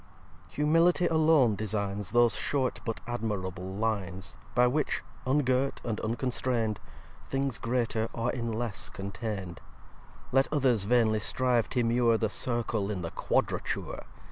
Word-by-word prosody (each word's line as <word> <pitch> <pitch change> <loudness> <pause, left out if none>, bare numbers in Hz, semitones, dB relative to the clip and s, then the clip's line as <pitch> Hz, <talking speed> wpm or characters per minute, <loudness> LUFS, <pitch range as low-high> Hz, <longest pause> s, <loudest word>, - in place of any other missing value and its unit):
vi - - -17
Humility 165 +4 +4
alone 155 -8 +4
designs 100 -1 -2
Those 120 -1 +4
short 135 -3 -1
but 115 -2 -3
admirable 95 -6 -3
Lines, 100 -4 -2 0.2
By 125 0 +5
which, 140 +4 0 0.2
ungirt 130 -1 +1
and 115 -3 -2
unconstrain'd, 115 -2 -1 0.5
Things 135 -3 -1
greater 115 -2 0
are 115 +1 0
in 115 -2 -3
less 110 -3 -3
contain'd. 100 -3 -5 0.7
Let 135 +1 +3
others 130 -9 +3
vainly 110 -1 +3
strive 125 +1 +1
t'immure 115 -2 +2
The 110 - +1
Circle 115 -4 -1
in 95 -4 -3
the 85 - -4
Quadrature! - - -1
115 Hz, 125 wpm, -29 LUFS, 105-130 Hz, 0.7 s, By